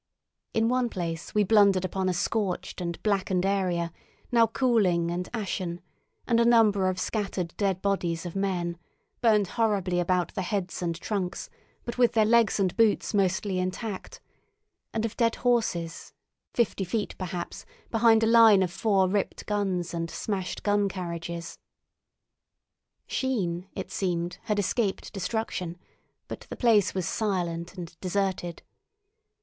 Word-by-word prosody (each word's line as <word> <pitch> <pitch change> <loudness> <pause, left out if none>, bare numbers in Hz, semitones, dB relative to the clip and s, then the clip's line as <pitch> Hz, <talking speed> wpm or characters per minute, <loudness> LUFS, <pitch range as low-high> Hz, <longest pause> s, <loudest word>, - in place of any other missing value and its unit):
In 225 0 +3
one 250 0 +1
place 170 -4 -5
we 210 - +5
blundered 200 -2 +4
upon 185 +1 -1
a - - +1
scorched 185 -2 -2
and 170 -1 -3
blackened 190 -3 +1
area, 180 -4 0 0.4
now 230 -2 +5
cooling 210 -8 +2
and 180 +1 -3
ashen, 185 -6 -3 0.5
and 235 -1 +2
a - - +5
number 215 -5 +4
of 185 0 -3
scattered 190 -5 -2
dead 195 -3 0
bodies 180 -4 0
of 175 - -6
men, 175 -3 -1 0.4
burned 215 -4 +4
horribly 200 -6 +1
about 180 0 0
the - - -2
heads 190 -1 -3
and 170 -1 -2
trunks 190 -3 -3 0.3
but 240 +1 -5
with 245 -2 +4
their 220 -1 +4
legs 230 -2 +4
and 185 -3 +1
boots 225 -1 +2
mostly 190 -1 +1
intact; 185 +2 -4 0.7
and 225 0 -1
of 225 - -4
dead 230 -2 +2
horses, 195 -9 -1 0.4
fifty 225 -4 0
feet, 205 +3 -2
perhaps, 180 -2 -5 0.3
behind 225 -1 +5
a - - +5
line 225 -4 +7
of 180 - -2
four 195 0 +2
ripped 200 +1 -2
guns 190 -5 -1
and 165 0 -2
smashed 190 -2 -3
gun 205 -1 +2
carriages. 170 -2 -5 1.5
Sheen, 190 -9 -1
it - - -5
seemed, 175 -1 -2
had 210 - 0
escaped 205 0 -1
destruction, 185 -3 -3 0.5
but - - -8
the - - -5
place 220 -7 +3
was 185 -3 -1
silent 175 -4 -2
and 170 -1 -7
deserted. 185 -2 -2
195 Hz, 145 wpm, -27 LUFS, 175-220 Hz, 1.5 s, line